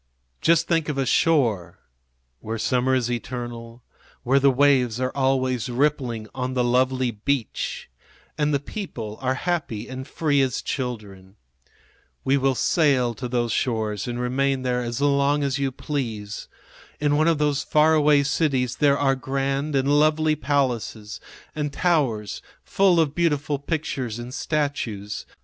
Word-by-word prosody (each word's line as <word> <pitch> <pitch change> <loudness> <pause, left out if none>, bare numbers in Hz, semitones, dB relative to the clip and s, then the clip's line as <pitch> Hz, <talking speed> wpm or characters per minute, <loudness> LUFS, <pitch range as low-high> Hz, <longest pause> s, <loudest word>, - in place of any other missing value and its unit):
Just 165 0 +3
think 165 -3 +1
of 145 - -2
a 135 - +1
shore 120 - +1 0.6
where 110 +7 -4
summer 125 +4 +1
is 120 -2 0
eternal, 120 -1 -6 0.4
where 135 +3 +3
the 140 0 +5
waves 130 -3 +3
are 130 0 -1
always 130 -3 0
rippling 125 -4 0
on 130 0 -3
the 125 - +2
lovely 130 +1 +1
beach 115 +3 -3 0.5
and 150 -1 +1
the 140 - +2
people 120 - -7
are 130 0 0
happy 155 -9 -2
and 130 0 -7
free 145 -3 +1
as 130 -3 -1
children. 105 -7 -5 0.9
We 135 - +2
will 135 -1 +2
sail 130 -6 +2
to 125 +3 -5
those 120 -1 -1
shores 110 -4 -1
and 120 0 -3
remain 130 +2 0
there 125 -1 0
as 120 +2 -4
long 140 0 +2
as 140 0 -1
you 135 -1 0
please. 115 -7 -4 0.5
In 145 -1 +2
one 155 +2 +3
of 165 -2 +3
those 150 -1 +1
far 155 +1 +4
away 150 -2 +4
cities 135 -4 0
there 140 -2 +3
are 135 -1 +2
grand 135 +3 -2
and 135 0 +1
lovely 155 0 +3
palaces 125 -7 -2 0.3
and 150 -1 -2
towers 135 - 0 0.2
full 190 -3 +3
of 155 -3 +2
beautiful 150 -4 0
pictures 140 -6 -3
and 120 +1 -7
statues. 135 -10 -3
135 Hz, 150 wpm, -24 LUFS, 120-145 Hz, 0.9 s, the